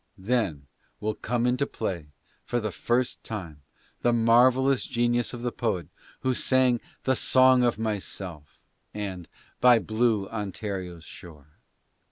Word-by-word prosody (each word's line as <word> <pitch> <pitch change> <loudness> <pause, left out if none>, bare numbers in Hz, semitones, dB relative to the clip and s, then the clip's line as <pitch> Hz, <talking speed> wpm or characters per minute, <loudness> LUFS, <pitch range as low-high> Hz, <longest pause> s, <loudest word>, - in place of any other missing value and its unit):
Then 95 - -1 0.3
will 110 +1 -1
come 120 +2 -1
into 125 +3 +1
play, 85 -5 -4 0.4
for 120 - -1
the 110 -2 -3
first 120 +6 -1
time, 85 -9 -7 0.4
the 120 - +3
marvellous 125 +3 +4
genius 120 -1 0
of 120 -1 -7
the 120 - -1
poet 105 -9 -2 0.3
who 130 - +1
sang 125 -1 +2 0.2
the 130 - +2
"Song 130 +1 +5
of 120 -1 +2
Myself" 95 -8 -5 0.4
and 95 -4 -5 0.3
"By 125 -1 +7
Blue 110 -2 +1
Ontario's 95 -5 -5
Shore.'"' 75 -5 -12
115 Hz, 130 wpm, -27 LUFS, 95-125 Hz, 0.4 s, By